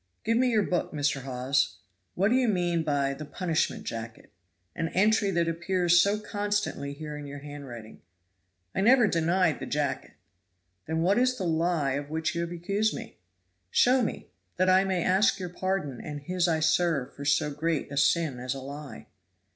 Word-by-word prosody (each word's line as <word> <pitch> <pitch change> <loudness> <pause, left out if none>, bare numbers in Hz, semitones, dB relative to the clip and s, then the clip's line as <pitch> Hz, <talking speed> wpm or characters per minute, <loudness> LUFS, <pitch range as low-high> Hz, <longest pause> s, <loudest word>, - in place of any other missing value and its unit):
"Give 230 +1 +1
me 250 +2 +3
your 220 -3 +3
book, 180 -2 -1
Mr. 145 -2 0
Hawes. 130 -5 0 0.4
What 195 +3 +2
do 245 - +3
you 255 -1 +3
mean 175 -5 +1
by 140 -3 0
'the 150 +2 -7
punishment 165 +1 -1
jacket,' 115 0 -7 0.4
an 165 - -1
entry 210 +2 +3
that 170 -3 +1
appears 175 +1 +3
so 200 +3 +2
constantly 205 -8 -2
here 150 +1 -7
in 145 -1 -7
your 140 0 -7
handwriting?" 140 -6 -9 0.7
"I - - 0
never 240 +3 +6
denied 170 -2 +2
the - - -6
jacket." 145 -2 -2 0.7
"Then 160 +1 0
what 195 +6 +3
is 255 0 +2
the 190 - -3
lie 165 -3 +1
of 140 +2 -3
which 160 +1 -1
you 170 - -2
have 170 0 -3
accused 200 +5 -1
me? - - -9 0.5
Show 255 - +4
me 225 - -3 0.3
that 185 +1 +3
I 190 +1 +5
may 185 -3 0
ask 200 +7 +3
your 180 -3 -5
pardon 180 -7 -3
and 145 -1 -6
His 180 +4 0
I 160 -2 +1
serve 160 -4 +1
for 140 - -8
so 145 +1 +2
great 155 0 -2
a - - -5
sin 145 -2 +2
as 125 +2 -3
a - - -5
lie." 140 -4 -8
165 Hz, 185 wpm, -28 LUFS, 145-190 Hz, 0.7 s, never